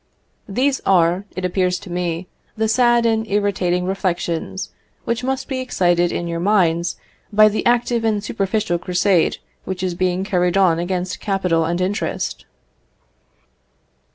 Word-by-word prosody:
These 265 +7 +1
are, 180 +1 +3
it 185 0 -3
appears 180 0 +1
to 180 - -11
me, 175 0 -2 0.3
the 220 0 +1
sad 240 +1 +3
and 225 -1 +1
irritating 195 -3 0
reflections 185 -1 -2 0.3
which 235 +1 -1
must 265 +1 -2
be 265 -2 -3
excited 175 -8 +1
in 170 - -3
your 170 0 -3
minds 175 -3 +2 0.4
by 215 +1 +6
the 210 - -2
active 240 -1 +2
and 215 -2 0
superficial 200 -3 -1
crusade 180 0 +2 0.3
which 190 0 -5
is 185 -1 -1
being 185 +1 0
carried 180 -1 +1
on 175 -4 +4
against 180 +1 -2
capital 180 -5 0
and 170 +2 -1
interest. 185 - -2
185 Hz, 140 wpm, -20 LUFS, 175-215 Hz, 0.4 s, by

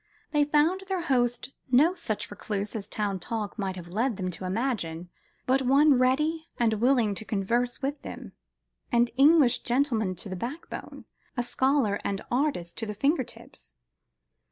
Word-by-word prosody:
They 295 -1 +3
found 305 +6 +2
their 375 -3 -1
host 245 -3 0 0.2
no 285 +8 +5
such 225 - -4
recluse 205 0 -4
as 205 -2 -3
town 205 -3 -2
talk 215 +3 -4
might 190 -2 -2
have 175 -2 -9
led 230 +1 0
them 185 -2 -2
to 185 - -7
imagine, 185 -6 -2 0.4
but 265 +1 +3
one 280 +3 +5
ready 305 +6 +1
and 230 -2 +2
willing 235 -1 +2
to 210 - -7
converse 235 +6 -1
with 280 +2 -2
them, - - -8 0.6
an 240 0 +3
English 285 -1 +5
gentleman 235 -7 0
to 180 - -8
the 185 - -4
backbone, 250 - -7 0.3
a 245 - +1
scholar 255 -4 +1
and 195 -1 -2
artist 245 - -1
to 225 - -3
the 210 - -4
finger 275 - +2
tips. - - -13
240 Hz, 160 wpm, -27 LUFS, 205-275 Hz, 0.6 s, no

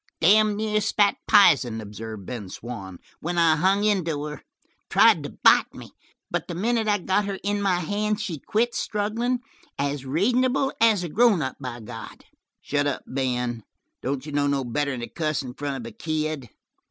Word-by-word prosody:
"Damed 210 +4 +4
near 215 0 0
spat 205 -1 +2
pizen," 135 - +5
observed 110 -1 -8
Ben 110 -5 -6
Swann, 100 -5 -8 0.2
"when 175 +2 -3
I 165 -2 +5
hung 190 +5 +2
into 170 -8 0
her 150 0 -6 0.5
tried - - +5
to - - -6
bite - - +5
me, - - -11 0.4
but - - -2
the 175 - -5
minute 225 +4 0
I 205 -1 +3
got 195 +2 0
her 200 -1 -3
in 205 +1 0
my 195 -2 +2
hands 210 +4 -1
she 175 -9 -4
quit 235 - 0
strugglin', 230 +4 -1 0.4
as 140 0 -2
reasonable 250 - +1
as 220 -5 +4
a - - -2
grown 210 -3 +3
up, 130 - -4
by 125 -3 -6
God!" 105 - -10 0.4
"Shut 145 0 0
up, 140 - -2
Ben. 125 -3 -2 0.4
Don't 135 +1 -3
you 150 - -7
know 145 0 +1
no 140 -1 0
better'n 130 +1 -2
to 120 - -4
cuss 155 -3 -2
in 125 -1 -7
front 140 0 -4
of 115 -3 -7
a 115 - -9
kid?" 155 -5 -3
155 Hz, 180 wpm, -25 LUFS, 130-205 Hz, 0.5 s, pizen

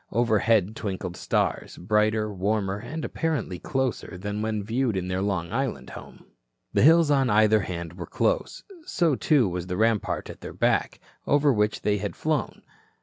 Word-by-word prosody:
Overhead 110 -3 +2
twinkled 95 -5 -4
stars, - - -1
brighter, 105 +2 +1
warmer 100 0 -1
and 155 +9 -5
apparently 145 - -2
closer 130 -8 -2
than 105 +3 -4
when 110 -1 -2
viewed 115 0 0
in 90 0 -3
their 90 +1 -1
Long 95 -4 -2
Island - - -2
home. - - -12 0.5
The - - +3
hills 160 +1 +6
on 135 -3 +3
either 110 +1 +4
hand 85 -4 -5
were 85 -1 -7
close. - - -1 0.2
So, 170 - +1
too, 135 -4 +3
was 90 -1 -4
the 90 -1 -3
rampart 110 -1 0
at - - -14
their - - -7
back, - - 0 0.3
over 145 -1 +4
which 105 -1 0
they 105 -1 +1
had 100 0 -4
flown. 155 -2 -2
105 Hz, 165 wpm, -26 LUFS, 95-130 Hz, 0.5 s, hills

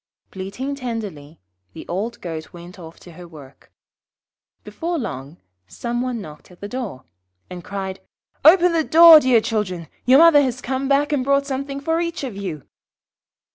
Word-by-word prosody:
Bleating 200 +9 -6
tenderly, 210 - -7 0.3
the - - -11
old 210 +7 -4
Goat 160 -3 -7
went 175 +3 -13
off 165 -1 -12
to 175 - -14
her 175 +1 -12
work. 145 -5 -16 0.9
Before 345 +1 -4
long, 145 - -6 0.3
some 240 - -4
one 250 -2 -3
knocked 150 -7 -12
at 180 - -18
the 205 - -7
door, 210 - -6 0.5
and 180 -1 -8
cried 190 -1 -6 0.4
'Open 355 +2 +6
the 325 -1 +1
door, 330 0 +8
dear 255 -5 +3
children! 200 -7 -3 0.2
Your 260 +2 +7
mother 325 -2 +7
has 255 -2 -2
come 265 +1 -3
back 280 +2 +1
and 270 -3 0
brought 280 +1 +1
something 275 0 -4
for 325 +4 -1
each 335 -3 -4
of 250 -7 -5
you.' 180 -7 -6
235 Hz, 165 wpm, -21 LUFS, 175-280 Hz, 0.9 s, door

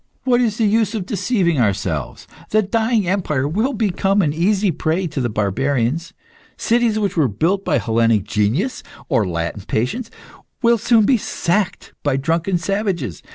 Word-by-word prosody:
What 250 -2 +3
is 225 -3 0
the 225 - +2
use 215 0 +2
of 200 -5 -3
deceiving 185 - 0
ourselves? 95 - -1 0.2
The 215 0 +3
dying 220 0 +1
empire 155 -8 0
will 220 - 0
become 200 -2 +1
an 145 -3 0
easy 195 +4 +1
prey 165 +3 -1
to 155 -4 -3
the 120 - 0
barbarians. 125 - -1 0.5
Cities 235 -2 +1
which 200 -3 -1
were 155 -6 +3
built 165 - 0
by - - +1
Hellenic 115 -2 +2
genius, 110 - -1 0.3
or 125 - +2
Latin 85 +3 -3
patience, 210 - -2 0.5
will 235 -1 +4
soon 225 0 +4
be 255 +3 +4
sacked 200 -1 -2
by 145 -2 0
drunken 165 +6 0
savages. 185 - -2
175 Hz, 155 wpm, -19 LUFS, 130-215 Hz, 0.5 s, will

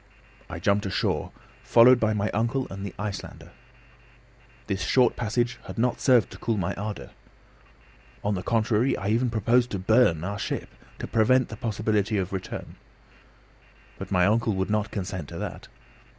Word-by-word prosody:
I - - -5
jumped 100 +3 +1
ashore, 95 - -1 0.3
followed 125 +2 +6
by 110 -1 +2
my 105 +1 -1
uncle 120 +5 0
and 95 0 -6
the 100 - -6
Icelander. 105 -1 -6 1.1
This 95 -2 -2
short 125 +8 +3
passage 120 +2 -1
had - - -8
not 120 +1 0
served 125 -5 +4
to - - -11
cool 115 -2 -1
my 90 -4 -1
ardour. 105 +1 -6 1.1
On 105 - 0
the 90 - -2
contrary, 115 +4 +1
I 95 - -3
even 120 +3 +2
proposed 120 +2 +2
to 100 - -3
burn 95 -4 +3
'our 100 +2 -4
ship,' - - -4 0.2
to - - -5
prevent 130 +4 +3
the 110 - -6
possibility 105 -1 -1
of 95 0 -2
return; 95 - -6 1.2
but - - -6
my 90 -2 +3
uncle 110 +2 +2
would 95 +1 -2
not 105 0 0
consent 90 -6 -5
to - - -8
that. - - -6
105 Hz, 165 wpm, -26 LUFS, 100-115 Hz, 1.2 s, followed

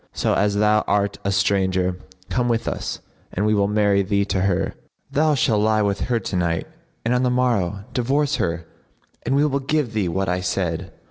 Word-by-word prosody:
So, - - 0
as 100 +1 +1
thou 105 +1 +3
art 100 0 0
a 100 - 0
stranger, 95 -2 +1 0.3
come 120 +5 0
with 115 -1 0
us - - -3 0.3
and 100 - -1
we 105 - +3
will 100 -1 +2
marry 105 -1 +2
thee 100 +1 +1
to 95 -2 -1
her; 95 -1 0 0.4
thou 150 +1 +3
shalt 120 -7 +2
lie 110 0 +2
with 100 -1 0
her 120 -2 +2
to 100 - -5
night 85 -2 0 0.4
and 120 - +2
on 125 - +2
the 125 - +2
morrow 115 -7 0
divorce 140 +4 +1
her 85 -1 -2 0.6
and 135 - +2
we 145 +2 +4
will 140 -2 0
give 135 -3 -1
thee 100 -5 0
what 95 +3 -1
I 90 +1 0
said." 90 -2 -2
105 Hz, 200 wpm, -22 LUFS, 95-120 Hz, 0.6 s, we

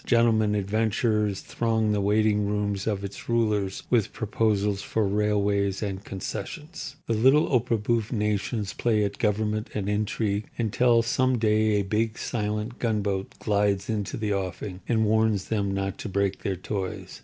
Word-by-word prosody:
Gentleman 110 -3 +3
adventurers 105 0 0
throng 110 -2 0
the 105 -1 +1
waiting 105 0 +2
rooms 100 -1 -1
of 100 -2 -1
its 100 +3 -7
rulers 105 -5 0
with 115 -5 +3
proposals 105 -2 0
for 110 -2 0
railways 100 -1 +1
and 95 -1 -4
concessions. 95 -3 -6
The 115 - 0
little 130 +7 +5
opéra 120 -3 +2
bouffe 115 -1 0
nations 105 -1 -1
play 110 -3 +1
at 100 0 -3
government 105 0 0
and 100 -2 -2
intrigue 105 0 -1
until 115 +1 +3
some 130 +2 +2
day 110 -1 +2
a 100 -1 +2
big, 110 +3 -1
silent 105 +1 -3
gunboat 100 -4 -1
glides 100 -1 +1
into 105 -3 -2
the 105 -2 -1
offing 95 0 -4
and 110 -2 +3
warns 110 -2 +2
them 100 -3 0
not 95 0 -2
to - - -5
break 100 0 0
their 95 - -2
toys. 95 +1 -5
105 Hz, 155 wpm, -26 LUFS, 100-110 Hz, -, little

